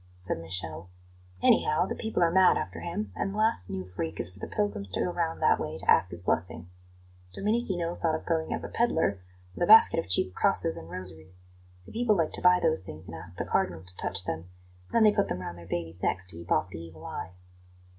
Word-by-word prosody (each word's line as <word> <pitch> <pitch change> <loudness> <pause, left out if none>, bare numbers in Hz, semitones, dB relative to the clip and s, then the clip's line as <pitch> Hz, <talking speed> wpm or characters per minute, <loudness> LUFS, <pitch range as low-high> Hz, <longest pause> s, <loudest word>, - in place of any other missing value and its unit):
said 90 -2 -3
Michele. 85 0 -5 0.5
"Anyhow, 155 +4 +4
the - - -3
people 220 -5 -1
are 165 - +3
mad 190 +1 +5
after - - -4
him, 205 +5 -4
and 195 - -2
the 205 - -6
last 215 - +2
new 95 -1 -4
freak 85 -3 -5
is 85 - -3
for 95 - -17
the - - -5
pilgrims 205 - -2
to 95 - -3
go 180 - 0
round 165 -2 -2
that - - +4
way - - -4
to - - -1
ask 90 - +5
his 85 0 -8
blessing. 85 0 -2 0.6
Domenichino 195 -6 -1
thought 165 -2 0
of 160 - -6
going 160 -2 -1
as - - -2
a - - -4
pedlar, 160 - +1 0.3
with - - -10
a - - +2
basket 220 -5 +8
of 165 - -4
cheap 90 0 +2
crosses - - +1
and 80 - -9
rosaries. 90 0 -10 0.4
The - - -12
people 225 -3 +2
like 165 -2 +1
to - - -4
buy 180 0 +6
those 160 - +2
things 80 -4 -9
and 80 - -7
ask 85 +2 -8
the - - -2
Cardinal 85 -2 0
to 90 0 -2
touch 95 0 0
them; 80 +3 -4 0.4
then 230 - +4
they 215 - +7
put 200 - +1
them - - -2
round 90 -1 -6
their 85 - -12
babies' 85 +1 -3
necks 95 +1 0
to 85 - -3
keep 85 +1 -10
off 80 +4 +2
the 80 - -8
evil 80 -1 -11
eye." 90 - -6
95 Hz, 235 wpm, -28 LUFS, -, 0.6 s, basket